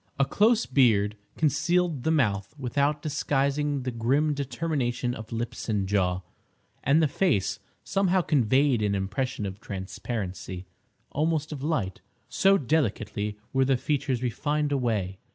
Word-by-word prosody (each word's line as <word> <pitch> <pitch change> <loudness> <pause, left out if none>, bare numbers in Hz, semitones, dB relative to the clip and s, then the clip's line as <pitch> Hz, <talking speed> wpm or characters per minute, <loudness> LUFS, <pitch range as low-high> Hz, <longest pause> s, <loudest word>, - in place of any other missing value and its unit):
A 135 - +3
close 220 - +3
beard 110 -6 +3 0.2
concealed 165 0 +1
the 160 - 0
mouth 105 -9 +1
without 140 +3 0
disguising 140 -1 0
the 130 - -2
grim 135 +7 +1
determination 135 -3 -1
of 110 -1 -9
lips 115 +1 -4
and 100 -3 0
jaw, 95 -2 +1 0.6
and 150 +5 +4
the - - +4
face 140 - +1 0.2
somehow 190 -1 +2
conveyed 135 -4 +3
an 105 -1 +1
impression 100 +4 -2
of 95 +1 -6
transparency, 95 -2 -5 0.5
almost 155 0 0
of 145 -3 -5
light, 135 - -1 0.3
so 195 +1 +4
delicately 110 - -1 0.2
were 135 0 +3
the 135 -1 +3
features 135 -2 -1
refined 145 +5 0
away. 110 -9 -1
130 Hz, 135 wpm, -27 LUFS, 105-150 Hz, 0.6 s, and